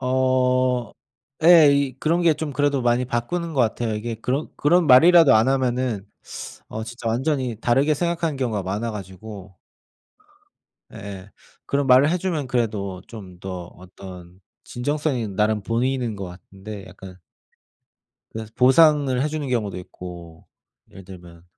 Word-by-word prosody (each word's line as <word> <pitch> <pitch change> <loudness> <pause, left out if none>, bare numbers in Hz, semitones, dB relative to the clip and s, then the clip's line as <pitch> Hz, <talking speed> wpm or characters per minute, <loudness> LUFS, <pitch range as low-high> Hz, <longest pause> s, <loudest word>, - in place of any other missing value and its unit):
어. 130 -1 +1 0.5
예 165 -1 +8
이 140 -2 0
그런 170 +4 +1
게 165 -2 +4
좀 155 -1 -5
그래도 145 0 +1
많이 120 +1 +1
바꾸는 140 +8 -3
것 135 - +2
같아요. 115 -1 0
이게 115 +2 -4
그런 125 +7 -3
그런 170 +3 +3
말이라도 160 +3 +7
안 110 +3 +4
하면은 125 -5 -1 0.6
어 110 - -5
진짜 120 0 -7
완전히 125 -1 -1
다르게 135 +6 +2
생각하는 165 -1 -2
경우가 110 -7 -2
많아 105 +5 -3
가지고 100 0 -10 1.4
예예. 100 -1 -9 0.4
그런 140 0 0
말을 135 +4 +5
해 180 - 0
주면 165 -6 -2
그래도 105 -7 -2
좀 95 -6 -11
더 90 -2 -6
어떤 90 -1 -13 0.2
진정성이 135 -2 -2
나름 105 +1 0
보이는 120 0 -1
것 100 - -6
같은데, 95 +3 -10
약간 95 -1 -12 1.2
그래서 110 -1 -7
보상을 135 -1 +4
해 150 - 0
주는 150 -2 -4
경우도 110 -7 -2
있고, 85 -2 -11 0.4
예를 95 - -13
들면 85 -2 -13
120 Hz, 285 characters per minute, -22 LUFS, 100-140 Hz, 1.4 s, 예